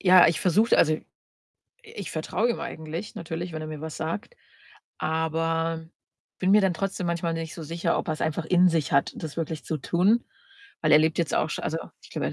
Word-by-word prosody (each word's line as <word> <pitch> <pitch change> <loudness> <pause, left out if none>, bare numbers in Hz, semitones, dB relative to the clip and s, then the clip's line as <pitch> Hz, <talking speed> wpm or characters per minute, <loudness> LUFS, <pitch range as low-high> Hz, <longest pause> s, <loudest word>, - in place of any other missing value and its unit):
ja, 185 -1 +8
ich 165 - 0
versuche 205 +6 +4
also, 155 -1 +5
i - - -8 0.8
ich 200 - -8
vertraue 215 +9 0
ihm 235 - -2
eigentlich 160 +5 -6
natürlich, 165 +1 -5
wenn 155 0 -4
er 155 - -5
mir 155 -1 -6
was 160 -1 -6
sagt, 170 - -4 0.6
aber 165 +1 0 0.6
bin 185 - +2
mir 210 - +7
dann 185 -3 +2
trotzdem 195 -1 -2
manchmal 170 -1 -1
nicht 165 -1 -5
so 165 - -7
sicher, 165 +2 -1
ob - - -4
er's 155 -1 -2
einfach 155 +1 -1
in 180 0 +5
sich 160 -5 0
hat, 140 - +3
das 155 -3 -6
wirklich 160 -1 -3
zu 155 - -2
tun. 190 - +2 0.6
Weil 155 -1 +3
er 150 - +9
lebt 160 +1 +2
jetzt 170 - +1
auch - - +2
schon - - -3
also, 160 +1 -1 0.2
ich - - -16
glaube, - - -2
er - - -5
165 Hz, 215 wpm, -26 LUFS, 155-180 Hz, 0.8 s, er